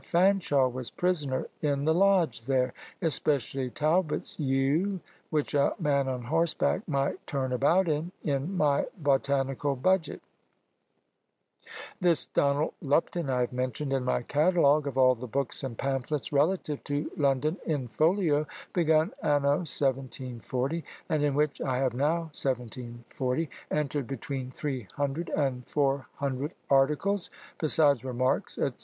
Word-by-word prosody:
Fanshaw 175 -7 +3
was 125 -1 -4
prisoner 150 -7 0 0.2
in 145 -2 0
the 160 - +4
lodge 180 - +3
there; 130 -2 +1 0.3
especially 135 -4 0
Talbot's 155 +5 0
yew, 145 +8 +1 0.3
which 150 -2 -1
a 140 -1 +2
man 140 -5 +1
on 130 -2 -3
horseback 165 +7 +1
might 140 -3 -1
turn 130 -2 -1
about 170 +9 +3
in, 155 +3 -1
in 145 +6 -1
my 145 -3 +2
botanical 140 -2 +1
budget. 185 +6 0 1.8
This 175 -5 +2
Donald 145 +2 +1
Lupton 150 +2 0
I 125 -1 +1
have 125 - -1
mentioned 130 +3 -2
in 135 -1 0
my 125 -1 0
catalogue 150 0 +3
of 135 -2 -4
all 130 -1 +6
the 125 +1 -7
books 135 +3 -2
and 125 -4 -5
pamphlets 135 +2 -2
relative 150 0 +1
to 145 +1 -2
London 145 +3 +1
in 145 -6 -1
folio, 155 - +2 0.3
begun 160 -2 +3
anno 145 -1 +3
1740, 130 +2 -2 0.3
and 155 -3 +1
in 145 -2 +1
which 150 0 0
I 130 -2 0
have 130 -2 +1
now, 160 +5 0
1740, 125 +3 -3 0.2
entered 145 -3 -1
between 135 -1 -4
300 140 - -3
and 130 -4 -1
400 140 0 -1 0.2
articles, 150 +9 +2 0.3
besides 145 -5 +3
remarks, 130 0 -1
&c. - - +1
140 Hz, 130 wpm, -28 LUFS, 130-155 Hz, 1.8 s, all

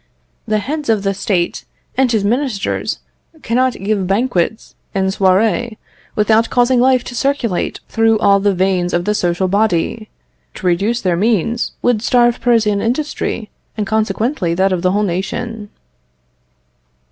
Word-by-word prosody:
The 215 - +1
head 285 +6 -4
of 215 -3 +2
the 195 0 0
State 190 -3 -1 0.3
and 260 -1 +2
his 220 -4 +1
ministers 235 -1 -1 0.5
cannot 255 +2 +1
give 200 -2 -2
banquets 205 -1 -1 0.2
and 190 0 +1
soirées 210 +4 +1 0.4
without 220 +2 +3
causing 245 0 +3
life 255 0 +3
to - - -8
circulate 245 -8 -1
through 225 -1 +2
all 200 -1 +4
the 200 -1 +1
veins 180 -1 0
of 175 0 -1
the 210 - +1
social 180 -2 0
body. 210 +2 0 0.5
To - - -8
reduce 200 +7 +1
their 180 -2 +1
means, 225 +3 0
would 245 -3 +2
starve 240 0 +2
Parisian 225 -4 +2
industry, 240 -3 -2 0.3
and 210 - -1
consequently 215 - -1
that 190 +2 +2
of 180 - -1
the 185 - +2
whole 205 +3 +1
nation." 205 +4 -3
215 Hz, 145 wpm, -17 LUFS, 190-240 Hz, 0.5 s, all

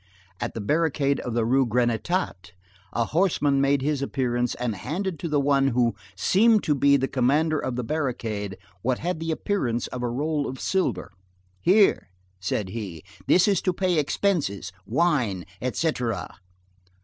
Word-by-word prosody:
At - - -4
the 115 - -3
barricade 145 +2 +1
of 120 -2 -4
the 115 -2 +1
Rue 135 +3 +3
Grenetat, 120 - -1 0.4
a 115 - 0
horseman 150 - +2
made 140 -1 +2
his 145 -1 0
appearance 125 -3 -1
and 120 -3 -2
handed 170 - -3
to 170 - -3
the 150 -1 +2
one 140 -1 +3
who 120 -3 +2 0.2
seemed 215 - +4
to 150 - +2
be 140 0 +4
the 135 0 0
commander 145 +5 +2
of 130 -2 -3
the 125 - -2
barricade 115 -9 -3 0.2
what 125 +3 0
had 175 -1 -3
the 165 0 -4
appearance 155 - -1
of 125 - -6
a 120 - -1
roll 145 +4 -1
of 130 0 -6
silver. 125 - -1 0.5
"Here," 195 - +4 0.3
said 95 +2 -2
he, 95 -7 -6 0.2
"this 180 - +5
is 200 -4 +2
to 185 - 0
pay 180 -2 +1
expenses, 145 - 0 0.2
wine, 120 - +1 0.2
et 130 0 -1
cætera." 125 - -1
135 Hz, 160 wpm, -25 LUFS, 120-160 Hz, 0.5 s, this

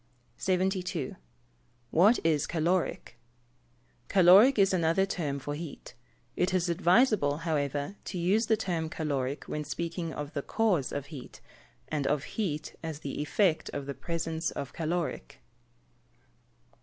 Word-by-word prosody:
72. 185 -5 -1 0.8
What 205 +9 +5
is 155 -3 +2
caloric? 165 -7 -1 0.9
Caloric 195 +8 +7
is 195 -1 +4
another 170 +2 +2
term 155 -8 -2
for 145 +1 -5
heat. 155 0 -8 0.4
It 180 +1 +1
is 180 -1 +1
advisable, 175 - +3
however, 145 +2 -1
to - - -5
use 200 +6 +2
the 220 - +3
term 170 -6 -2
caloric 140 -4 -2
when 150 - -3
speaking 165 +2 -4
of 145 -1 -6
the 140 - -2
cause 185 - +1
of 145 -1 -3
heat, 135 -4 -9 0.5
and 145 -3 -1
of 150 0 +1
heat 165 -9 -3
as 160 -2 -5
the 140 - -4
effect 160 +2 +1
of 145 -1 -4
the 140 - -4
presence 165 +3 -3
of 140 - -6
caloric. 165 - -3
165 Hz, 130 wpm, -29 LUFS, 145-185 Hz, 0.9 s, Caloric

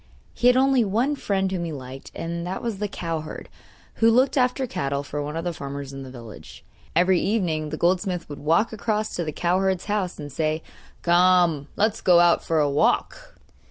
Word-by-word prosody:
He 245 - +1
had 250 0 +6
only 265 -2 +4
one 235 +8 0
friend 195 -7 -1
whom 180 -2 -2
he 170 - -4
liked, 135 -2 -9
and 170 +1 -4
that 190 +2 -4
was 220 -4 -3
a 210 - 0
cowherd, 165 -5 -5 0.5
who 225 - +5
looked 255 +5 +3
after 255 0 +1
cattle 140 - -2
for 145 +1 -4
one 150 +2 -4
of 165 - -3
the 175 - -2
farmers 140 -2 -6
in 135 - -7
the 135 - -8
village. 120 -4 -12 0.3
Every 180 +1 +4
evening 170 -8 -1
the 155 - -4
goldsmith 180 +1 0
would 145 - -8
walk 165 +10 +2
across 215 0 -2
to 175 - -1
the 155 - -3
cowherd's 185 +3 0
house 205 -3 -2
and 145 -1 -7
say: 155 +2 -1 0.4
'Come, 175 -4 +4
let's 215 +1 +1
go 175 -2 +5
out 175 0 +4
for 165 - 0
a 150 -1 +3
walk! 240 - 0
175 Hz, 195 wpm, -24 LUFS, 155-210 Hz, 0.5 s, had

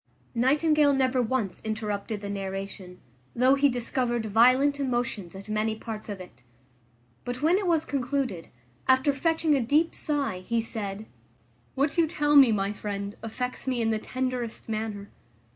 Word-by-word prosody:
Nightingale 290 +4 +3
never 260 -1 +2
once 230 -5 -2
interrupted 215 -1 -3
the 200 - -5
narration, 195 -2 -6 0.4
though 255 +2 +4
he 280 +1 +4
discovered 240 -1 0
violent 255 +7 +4
emotions 240 -9 -2
at 195 +2 -9
many 215 +1 0
parts 220 -1 -7
of 200 -2 -5
it. 180 -10 -12 0.8
But 245 +3 -5
when 345 +5 +4
it 395 - -2
was 325 -2 +2
concluded, 260 - -2 0.4
after 260 +2 +4
fetching 320 +2 +1
a 275 - +2
deep 300 +8 +2
sigh, 280 - -1
he 230 +5 -1
said, 215 -2 -3 0.7
"What 280 +5 +1
you 330 - +4
tell 295 -2 +1
me, 270 -5 +8
my 200 -1 0
friend, 200 -1 -5
affects 250 +4 -5
me 255 -2 0
in 225 -1 +1
the 220 - 0
tenderest 255 -1 -3
manner. 215 -2 -4
240 Hz, 155 wpm, -27 LUFS, 210-275 Hz, 0.8 s, me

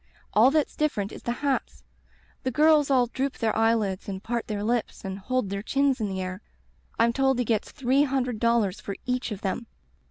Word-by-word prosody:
All 225 +5 +6
that's 300 +1 +1
different 220 -10 -1
is - - -9
the 240 - -2
hats; 275 -2 -1 0.6
the 260 - -1
girls 300 +2 +4
all 255 -3 +4
droop 265 +3 -3
their 220 -1 0
eyelids 220 -4 +1
and 190 -1 -5
part 235 0 -2
their 205 -2 -3
lips 230 -1 -1
and 190 0 -4
hold 255 -1 -1
their 200 0 -2
chins 275 +2 +1
in 210 - -1
the 190 -1 -3
air. 185 +2 -5 0.6
I'm 235 +1 +3
told 265 0 +2
he 245 - 0
gets 220 -2 0
three 270 0 +2
hundred 260 -5 0
dollars 230 -4 +1
for 200 - -5
each 250 -1 -1
of 200 - -5
them.' 210 +4 -3
235 Hz, 200 wpm, -26 LUFS, 205-265 Hz, 0.6 s, All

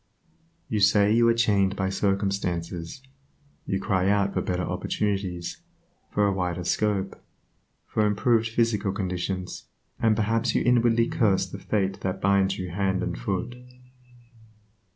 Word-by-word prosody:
You 110 - -1
say 100 +1 +4
you 115 +1 +4
are 115 - +5
chained 100 -4 +2
by 95 -1 -1
circumstances; 95 -1 -2 0.6
you 95 - 0
cry 95 -2 +1
out 100 -1 +2
for - - 0
better 90 0 -2
opportunities, 95 -3 -3 0.5
for 105 - +1
a 100 - +2
wider 90 -2 -2
scope, 100 +1 -1 0.6
for 110 - 0
improved 115 +2 +2
physical 110 -4 0
conditions, 90 -1 -4 0.3
and 110 -2 +3
perhaps 115 +1 0
you - - +2
inwardly 115 -1 +3
curse 100 -5 +2
the - - -8
fate 95 -2 -1
that 95 0 -2
binds 100 0 +2
you 90 -2 -5
hand 95 0 0
and - - -2
foot. 95 - -3
100 Hz, 135 wpm, -26 LUFS, 95-110 Hz, 0.6 s, are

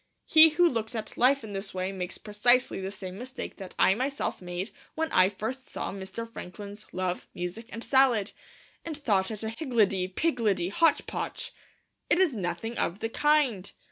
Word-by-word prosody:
He 320 0 +8
who 345 +3 +4
looks 230 -6 -2
at 220 - -5
life 270 +2 +4
in 210 -2 -7
this 195 0 -5
way 185 +1 -1
makes 185 -2 -5
precisely 220 +2 +2
the 190 - -3
same 190 -1 -7
mistake 260 +2 -7
that 190 -2 -9
I 190 - +5
myself 265 +3 -2
made 180 +2 -4 0.2
when 320 0 -1
I 185 0 +5
first 225 +6 -5
saw - - -4
Mr. 195 +4 -6
Franklin's 205 -1 -9
Love, 185 -1 -2
Music, 180 +6 -5
and 230 - -6
Salad, 250 -6 +3 0.5
and 320 -3 -4
thought 205 -10 +1
it 220 -1 -5
a 220 - -1
higgledy 220 - +1
piggledy 205 - 0
hotch 325 +10 +3
potch. - - -4 0.6
It - - +4
is 365 -6 +3
nothing 225 +3 -3
of 170 - 0
the 225 +2 -3
kind. 270 -9 +2
220 Hz, 175 wpm, -28 LUFS, 190-260 Hz, 0.6 s, He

